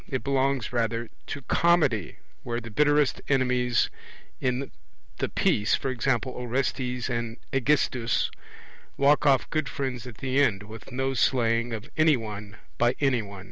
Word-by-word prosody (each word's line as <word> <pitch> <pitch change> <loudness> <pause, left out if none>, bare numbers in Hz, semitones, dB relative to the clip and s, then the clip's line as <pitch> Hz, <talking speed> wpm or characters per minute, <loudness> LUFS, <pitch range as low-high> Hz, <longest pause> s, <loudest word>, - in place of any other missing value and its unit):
It 130 -2 -3
belongs 135 -3 0
rather 115 -1 -1 0.2
to 140 - -5
Comedy, 145 - +2 0.3
where 120 -1 -3
the 115 -1 -9
bitterest 145 +3 +3
enemies 125 -2 +2 0.5
in 130 +1 -1 0.5
the - - -1
piece 105 +1 +2
(e.g. 130 0 -1 0.2
Orestes 125 0 -2
and 120 -2 -3 0.2
Aegisthus) 135 -3 +1 0.7
walk 145 +2 +4
off 135 -4 +4
good 155 -4 0
friends 130 -3 -4
at 120 - -10
the 135 +1 +1
end, 105 -7 +2
with 110 +4 -11
no 135 +1 -1
slaying 115 -2 +2
of 110 +1 -5
any 155 -3 +5
one 105 -2 -7 0.2
by 120 +1 +3
any 135 -4 +2
one. 100 -2 -9
125 Hz, 140 wpm, -27 LUFS, 115-135 Hz, 0.7 s, any